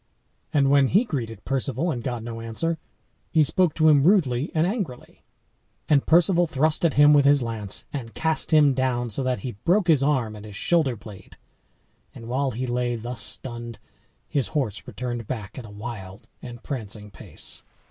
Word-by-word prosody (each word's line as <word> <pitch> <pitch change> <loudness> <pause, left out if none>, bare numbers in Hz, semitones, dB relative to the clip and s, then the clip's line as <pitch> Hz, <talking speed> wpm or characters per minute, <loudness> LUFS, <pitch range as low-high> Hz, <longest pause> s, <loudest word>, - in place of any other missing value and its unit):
And 140 -2 +3
when 140 -1 +5
he 200 - +4
greeted 115 - -5
Perceval, 135 +4 -1
and 120 - -3
got 120 -2 -4
no 115 -1 -6
answer, 160 +9 -2 0.5
he 160 -2 +4
spoke 175 +2 +2
to 155 -1 +3
him 150 -3 +6
rudely 150 -7 +3
and 160 +1 +3
angrily. 185 - -4 0.7
And 145 -2 +3
Perceval 175 +1 +4
thrust 155 +2 +1
at 165 - +2
him 145 +1 +7
with 145 -1 +5
his 140 -2 +5
lance, 110 -4 -3
and 120 -5 -6
cast 160 -1 0
him 150 -3 +5
down 125 -2 -1
so 105 - -2
that 130 -1 -1
he 130 - -4
broke 185 +2 +3
his 155 -5 +5
arm 130 -7 +1
and 105 - -10
his 105 -2 -10
shoulder 150 - +1
blade. 105 -2 -13 0.8
And 115 - -10
while 135 +3 0
he 125 +1 -3
lay 120 0 -1
thus 120 +1 -5
stunned 120 +2 -5 0.5
his 140 -4 0
horse 110 -8 -1
returned 120 -3 -5
back 115 -2 -5
at 120 - -9
a - - -11
wild 105 -2 -8
and 120 -1 -9
prancing 105 -6 -6
pace. - - -4
130 Hz, 180 wpm, -24 LUFS, 115-150 Hz, 0.8 s, him